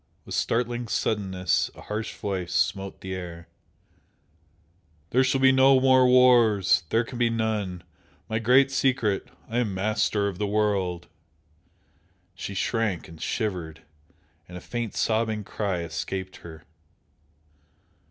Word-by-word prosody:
With -, -, -8 dB
startling 120 Hz, 0 st, -1 dB
suddenness 95 Hz, -5 st, 0 dB
a -, -, -12 dB
harsh 110 Hz, +1 st, -5 dB
voice 95 Hz, -3 st, -4 dB
smote 95 Hz, +1 st, -1 dB
the 95 Hz, 0 st, -5 dB
air 85 Hz, -2 st, -7 dB, 1.6 s
"There 130 Hz, +2 st, +4 dB
shall 130 Hz, 0 st, +1 dB
be 135 Hz, 0 st, +6 dB
no 130 Hz, 0 st, +5 dB
more 130 Hz, -1 st, +5 dB
wars! 120 Hz, -6 st, +5 dB
There 115 Hz, +1 st, +2 dB
can 120 Hz, +1 st, -8 dB
be 120 Hz, -1 st, +3 dB
none! 105 Hz, -6 st, -2 dB, 0.4 s
My 110 Hz, -1 st, -1 dB
Great 130 Hz, +4 st, +4 dB
Secret! 130 Hz, -6 st, 0 dB, 0.2 s
I 115 Hz, +2 st, -1 dB
am 105 Hz, -6 st, -1 dB
Master 105 Hz, +1 st, 0 dB
of 95 Hz, -2 st, -5 dB
the 105 Hz, -, 0 dB
World!" 100 Hz, -5 st, 0 dB, 1.3 s
She 100 Hz, +2 st, -7 dB
shrank 105 Hz, -3 st, -1 dB
and 80 Hz, -1 st, -13 dB
shivered, 90 Hz, -8 st, -3 dB, 0.6 s
and 90 Hz, -, -9 dB
a -, -, -6 dB
faint 120 Hz, +2 st, -5 dB
sobbing 110 Hz, -1 st, 0 dB
cry 95 Hz, -3 st, -3 dB
escaped 90 Hz, +4 st, -5 dB
her. 80 Hz, -2 st, -12 dB
105 Hz, 130 wpm, -26 LUFS, 95-120 Hz, 1.6 s, be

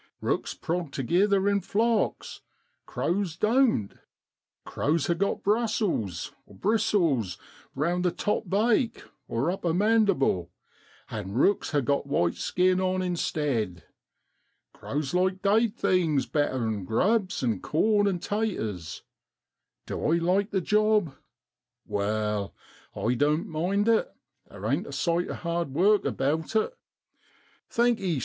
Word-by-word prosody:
Eooks -, -, -2 dB
prog 170 Hz, -3 st, -2 dB
togither 190 Hz, -, +2 dB
in 200 Hz, 0 st, +2 dB
flocks, 225 Hz, +4 st, 0 dB, 0.5 s
crows 180 Hz, -2 st, -1 dB
doan't. 220 Hz, -, +2 dB, 0.7 s
Crows 150 Hz, +1 st, 0 dB
ha' 170 Hz, -, +1 dB
got 200 Hz, +4 st, -1 dB
brussels 205 Hz, -, 0 dB, 0.2 s
(bristles) 190 Hz, -, +1 dB, 0.4 s
round 170 Hz, +6 st, 0 dB
the 180 Hz, -, +3 dB
top 205 Hz, +2 st, -2 dB
bake 225 Hz, +5 st, +1 dB, 0.3 s
(upper 165 Hz, +6 st, 0 dB
mandible), 195 Hz, -, +2 dB, 0.6 s
an' 100 Hz, -3 st, -5 dB
rooks 185 Hz, -, +2 dB
ha' 145 Hz, -3 st, +1 dB
got 140 Hz, +2 st, 0 dB
white 85 Hz, -12 st, +1 dB
skin 185 Hz, +1 st, +1 dB
on 185 Hz, 0 st, 0 dB
instead. 140 Hz, -, -1 dB, 0.9 s
Crows 140 Hz, -1 st, -4 dB
like 185 Hz, +1 st, +1 dB
dade 215 Hz, +2 st, +3 dB
things 165 Hz, -, +1 dB
better 130 Hz, -5 st, 0 dB
'an 110 Hz, -3 st, -2 dB
grubs 190 Hz, -, +1 dB
and 110 Hz, -6 st, 0 dB
corn 205 Hz, +5 st, +2 dB
an' 190 Hz, -3 st, +1 dB
taters. 110 Hz, -, -3 dB, 0.8 s
Du -, -, -5 dB
I -, -, +4 dB
like 185 Hz, +4 st, +1 dB
the 195 Hz, -3 st, 0 dB
job? 210 Hz, -6 st, +2 dB, 0.7 s
Wai, 105 Hz, 0 st, -1 dB, 0.5 s
I 120 Hz, -, 0 dB
doan't 150 Hz, +6 st, +1 dB
mind 185 Hz, +7 st, 0 dB
it, 230 Hz, -1 st, +2 dB, 0.4 s
there -, -, -9 dB
ain't -, -, 0 dB
a -, -, -8 dB
sight 170 Hz, +1 st, 0 dB
o'hard 170 Hz, -5 st, -3 dB
work 205 Hz, +5 st, +4 dB
about 155 Hz, +9 st, -1 dB
it. 480 Hz, -, +1 dB, 0.9 s
Thankee! 220 Hz, -, +1 dB
175 Hz, 120 wpm, -27 LUFS, 135-205 Hz, 0.9 s, I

